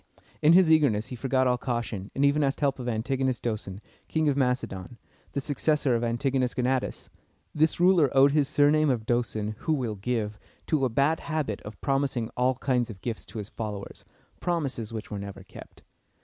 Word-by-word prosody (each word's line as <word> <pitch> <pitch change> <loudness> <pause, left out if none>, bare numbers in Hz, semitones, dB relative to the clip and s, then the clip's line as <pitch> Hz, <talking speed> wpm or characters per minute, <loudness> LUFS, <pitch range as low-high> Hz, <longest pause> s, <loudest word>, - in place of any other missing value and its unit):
In 155 +2 +6
his 180 -2 +6
eagerness 135 -9 +3
he 125 - -5
forgot 130 +2 +1
all 125 -1 +2
caution, 120 -6 -3
and 140 - +2
even 145 +1 +3
asked 135 0 0
help 140 -2 +1
of 125 -1 -3
Antigonus 130 +3 -1
Do´son, 105 -5 -4 0.3
King 160 -1 0
of 140 - +1
Macedon, 125 -6 -2 0.4
the - - -1
successor 145 -1 +1
of 115 0 0
Antigonus 125 +2 0
Gonatas. 130 0 -1 0.4
This 155 +2 +2
ruler 175 -5 +5
owed 140 +1 +7
his 145 -1 +2
surname 150 +2 +3
of 120 -4 0
Doson 110 -3 -1
("who 160 - 0
will 125 -7 -1
give") 105 0 -3 0.3
to 150 -4 +1
a - - +1
bad 140 +7 +2
habit 150 -10 -3
of 105 0 -10
promising 135 -5 0
all 125 +1 +2
kinds 125 -2 0
of 100 -4 -10
gifts 115 -3 -4
to - - -9
his 105 -1 -5
followers, 105 -3 -6 0.4
promises 140 -11 -2
which 110 -1 -6
were 105 - -3
never 100 -1 -8
kept. - - -14
125 Hz, 185 wpm, -27 LUFS, 110-140 Hz, 0.4 s, owed